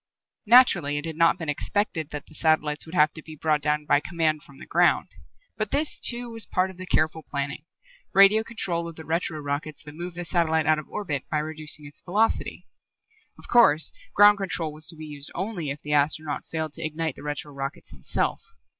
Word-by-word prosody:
Naturally, 230 Hz, -, +6 dB
it 145 Hz, -, -3 dB
had 160 Hz, -1 st, -5 dB
not 165 Hz, +2 st, +4 dB
been 165 Hz, -3 st, -6 dB
expected 160 Hz, +1 st, -1 dB
that 150 Hz, -1 st, -6 dB
the -, -, -18 dB
satellites 155 Hz, -1 st, +1 dB
would 165 Hz, -, -8 dB
have 150 Hz, -2 st, +4 dB
to 160 Hz, -, -9 dB
be 155 Hz, 0 st, -11 dB
brought 155 Hz, 0 st, +1 dB
down 150 Hz, 0 st, 0 dB
by 145 Hz, -, +4 dB
command 160 Hz, -1 st, 0 dB
from 140 Hz, -2 st, -16 dB
the -, -, -11 dB
ground. -, -, +2 dB, 0.5 s
But -, -, -2 dB
this, 300 Hz, +1 st, 0 dB
too, 240 Hz, -1 st, -1 dB
was 225 Hz, -1 st, -3 dB
part 185 Hz, 0 st, 0 dB
of 185 Hz, -, -16 dB
the 185 Hz, 0 st, -8 dB
careful 160 Hz, -1 st, +1 dB
planning 140 Hz, 0 st, -4 dB, 0.5 s
radio 200 Hz, +3 st, +6 dB
control 175 Hz, -7 st, -3 dB
of 165 Hz, -, -8 dB
the 160 Hz, -, -10 dB
retro 160 Hz, -1 st, -1 dB
rockets 145 Hz, +1 st, -4 dB
that 150 Hz, -, -11 dB
move 175 Hz, +2 st, -7 dB
the 175 Hz, 0 st, -5 dB
satellite 160 Hz, -3 st, +1 dB
out 155 Hz, -1 st, +3 dB
of 155 Hz, -, -9 dB
orbit 150 Hz, -10 st, -3 dB
by 155 Hz, -, 0 dB
reducing 155 Hz, -1 st, -4 dB
its 145 Hz, -, -11 dB
velocity. 210 Hz, +5 st, 0 dB, 0.7 s
Of -, -, -11 dB
course, 160 Hz, -11 st, +5 dB, 0.2 s
ground 205 Hz, 0 st, +7 dB
control 170 Hz, -5 st, -2 dB
was 155 Hz, +1 st, -4 dB
to -, -, -5 dB
be 155 Hz, 0 st, -8 dB
used 145 Hz, -2 st, -6 dB
only 185 Hz, -5 st, -3 dB
if 140 Hz, +1 st, -6 dB
the 150 Hz, -, -2 dB
astronaut 150 Hz, +1 st, +1 dB
failed 160 Hz, -2 st, -4 dB
to 165 Hz, -, -7 dB
ignite 160 Hz, -1 st, -2 dB
the -, -, -12 dB
retro 145 Hz, 0 st, -5 dB
rockets 140 Hz, -4 st, -6 dB
himself. 65 Hz, -5 st, -2 dB
155 Hz, 210 wpm, -25 LUFS, 150-175 Hz, 0.7 s, ground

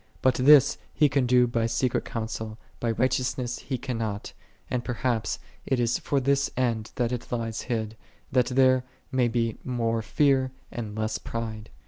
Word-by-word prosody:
But 130 Hz, -, +5 dB
this 135 Hz, +2 st, +6 dB, 0.2 s
He 150 Hz, -, +5 dB
can 135 Hz, -2 st, +1 dB
do 125 Hz, 0 st, +5 dB
by 115 Hz, -1 st, 0 dB
secret 115 Hz, +2 st, 0 dB
counsel, 110 Hz, -2 st, -4 dB, 0.2 s
by 120 Hz, -, -2 dB
un 115 Hz, -, 0 dB
righteous 130 Hz, 0 st, +1 dB, 0.2 s
He 130 Hz, -, -3 dB
cannot: 115 Hz, -5 st, -4 dB, 0.3 s
and 125 Hz, -1 st, -2 dB
perhaps 120 Hz, -2 st, -1 dB, 0.3 s
it 130 Hz, -, +1 dB
is 120 Hz, 0 st, +1 dB
for 140 Hz, -, 0 dB
this 140 Hz, +1 st, +2 dB
end 115 Hz, -4 st, 0 dB
that 120 Hz, -1 st, 0 dB
it 125 Hz, -2 st, -5 dB
lies 115 Hz, -2 st, -2 dB
hid, 110 Hz, -2 st, -2 dB, 0.4 s
that 125 Hz, -1 st, +3 dB
there 130 Hz, 0 st, +4 dB, 0.3 s
may 130 Hz, -2 st, +3 dB
be 115 Hz, -1 st, -1 dB
more 115 Hz, -3 st, 0 dB
fear, 130 Hz, +1 st, +2 dB, 0.2 s
and 110 Hz, -3 st, -5 dB
less 110 Hz, 0 st, -1 dB
pride. 110 Hz, -2 st, -5 dB
120 Hz, 165 wpm, -27 LUFS, 115-130 Hz, 0.4 s, this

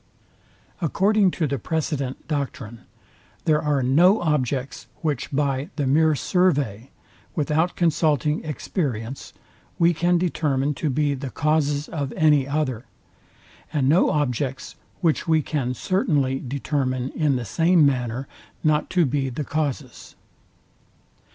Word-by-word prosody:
According 195 Hz, +5 st, +3 dB
to 165 Hz, -, +1 dB
the 140 Hz, -2 st, -2 dB
precedent 140 Hz, -1 st, -3 dB
doctrine, 135 Hz, -6 st, -4 dB, 0.7 s
there 155 Hz, -1 st, +3 dB
are 145 Hz, -3 st, +1 dB
no 175 Hz, -, +5 dB
objects 140 Hz, -4 st, -1 dB
which 145 Hz, -5 st, -2 dB
by 140 Hz, 0 st, -1 dB
the 145 Hz, -, -1 dB
mere 155 Hz, +3 st, +3 dB
survey, 140 Hz, -, 0 dB, 0.5 s
without 155 Hz, +3 st, 0 dB
consulting 155 Hz, -3 st, +1 dB
experience, 135 Hz, -, -4 dB, 0.5 s
we 170 Hz, +1 st, +4 dB
can 175 Hz, +2 st, +2 dB
determine 150 Hz, -5 st, 0 dB
to 150 Hz, +2 st, -2 dB
be 145 Hz, +1 st, +1 dB
the 135 Hz, 0 st, -5 dB
causes 150 Hz, 0 st, 0 dB
of 145 Hz, -4 st, -4 dB
any 150 Hz, -4 st, +3 dB
other; 140 Hz, -5 st, -2 dB, 0.9 s
and 145 Hz, -4 st, +1 dB
no 160 Hz, +7 st, +4 dB
objects, 135 Hz, -3 st, -2 dB, 0.3 s
which 165 Hz, -1 st, +1 dB
we 160 Hz, -2 st, +3 dB
can 130 Hz, -5 st, -2 dB
certainly 140 Hz, -, 0 dB
determine 130 Hz, -1 st, -2 dB
in 150 Hz, -4 st, +1 dB
the 125 Hz, -2 st, -3 dB
same 165 Hz, -, +3 dB
manner 125 Hz, -1 st, -1 dB, 0.4 s
not 155 Hz, -1 st, +2 dB
to 180 Hz, -3 st, +3 dB
be 135 Hz, 0 st, -1 dB
the 130 Hz, +4 st, -4 dB
causes. 145 Hz, -4 st, -4 dB
145 Hz, 125 wpm, -23 LUFS, 130-160 Hz, 0.9 s, no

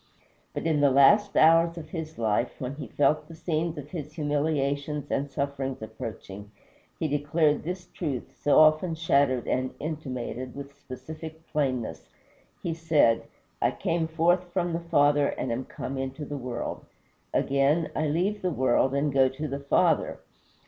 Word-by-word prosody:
But -, -, -3 dB
in 160 Hz, -2 st, +2 dB
the 145 Hz, -, +6 dB
last 200 Hz, +10 st, +5 dB
hours 165 Hz, +1 st, +5 dB
of 155 Hz, -2 st, -8 dB
his 160 Hz, -2 st, -6 dB
life, 115 Hz, +1 st, 0 dB
when 130 Hz, +1 st, -4 dB
he 155 Hz, -, -6 dB
felt 150 Hz, +2 st, +1 dB
the 165 Hz, -, -11 dB
scenes 160 Hz, 0 st, -2 dB
of 145 Hz, 0 st, -8 dB
his 150 Hz, -4 st, -6 dB
humiliations 145 Hz, -1 st, -1 dB
and 140 Hz, +1 st, -1 dB
sufferings 135 Hz, -1 st, -3 dB
approaching, 105 Hz, -2 st, -8 dB, 0.5 s
he 160 Hz, -, -1 dB
declared 150 Hz, +1 st, +1 dB
this 180 Hz, +3 st, -5 dB
truth, 145 Hz, -8 st, -5 dB
so 145 Hz, -, +4 dB
often 155 Hz, +2 st, +5 dB
shadowed 140 Hz, -6 st, +2 dB
and 130 Hz, 0 st, -1 dB
intimated, 130 Hz, -5 st, -5 dB
with 140 Hz, 0 st, -7 dB
explicit 155 Hz, +4 st, -9 dB
plainness. 130 Hz, -6 st, -2 dB, 0.5 s
He 170 Hz, -, -1 dB
said, 160 Hz, -8 st, +3 dB, 0.4 s
"I -, -, +4 dB
came 165 Hz, -1 st, -1 dB
forth 170 Hz, +3 st, +2 dB
from 175 Hz, -2 st, -1 dB
the 165 Hz, -, 0 dB
Father, 145 Hz, -3 st, +3 dB
and 130 Hz, -, -3 dB
am 125 Hz, +3 st, -2 dB
come 135 Hz, 0 st, -5 dB
into 135 Hz, +3 st, -4 dB
the 145 Hz, -, -5 dB
world. 125 Hz, -3 st, -4 dB, 0.5 s
Again, 140 Hz, +4 st, +2 dB
I 155 Hz, -, 0 dB
leave 185 Hz, +8 st, 0 dB
the 185 Hz, -, 0 dB
world, 130 Hz, -2 st, +2 dB
and 140 Hz, 0 st, +1 dB
go 135 Hz, -1 st, +5 dB
to 145 Hz, +4 st, -5 dB
the 140 Hz, 0 st, -4 dB
Father." 140 Hz, 0 st, +2 dB
145 Hz, 160 wpm, -27 LUFS, 135-160 Hz, 0.5 s, the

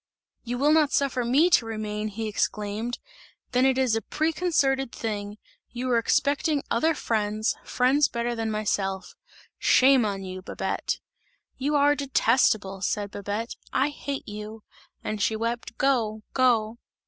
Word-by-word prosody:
"You 245 Hz, +1 st, -3 dB
will 290 Hz, +4 st, +3 dB
not 305 Hz, -2 st, +4 dB
suffer 265 Hz, -3 st, +1 dB
me 285 Hz, +9 st, +3 dB
to 235 Hz, -, +5 dB
remain," 215 Hz, -1 st, -3 dB
he 220 Hz, +1 st, -4 dB
exclaimed, 210 Hz, +3 st, -2 dB, 0.5 s
"then 255 Hz, +1 st, +3 dB
it 260 Hz, -1 st, +2 dB
is 255 Hz, -4 st, +2 dB
a 225 Hz, -, 0 dB
preconcerted 305 Hz, -5 st, 0 dB
thing! 205 Hz, -2 st, -4 dB, 0.3 s
You 245 Hz, +1 st, -5 dB
were 240 Hz, -2 st, +4 dB
expecting 285 Hz, +5 st, +1 dB
other 315 Hz, +8 st, +2 dB
friends, 215 Hz, -3 st, -1 dB
friends 270 Hz, +4 st, +3 dB
better 235 Hz, 0 st, -2 dB
than 225 Hz, -1 st, -2 dB
myself; 200 Hz, -3 st, -2 dB, 0.5 s
shame 260 Hz, -1 st, +5 dB
on 200 Hz, -2 st, -2 dB
you, 185 Hz, 0 st, -6 dB
Babette!" -, -, -3 dB, 0.6 s
"You 285 Hz, +3 st, -1 dB
are 290 Hz, 0 st, +5 dB
detestable," 230 Hz, -8 st, +1 dB
said 205 Hz, +1 st, -1 dB
Babette, 205 Hz, +4 st, -4 dB, 0.2 s
"I 270 Hz, +3 st, +2 dB
hate 285 Hz, -1 st, -5 dB
you!" 210 Hz, +1 st, -8 dB, 0.4 s
and 215 Hz, -1 st, -3 dB
she 220 Hz, -, +1 dB
wept. 230 Hz, +1 st, -3 dB
"Go! 225 Hz, -6 st, +1 dB
Go!" 235 Hz, -3 st, +2 dB
235 Hz, 145 wpm, -26 LUFS, 215-270 Hz, 0.6 s, to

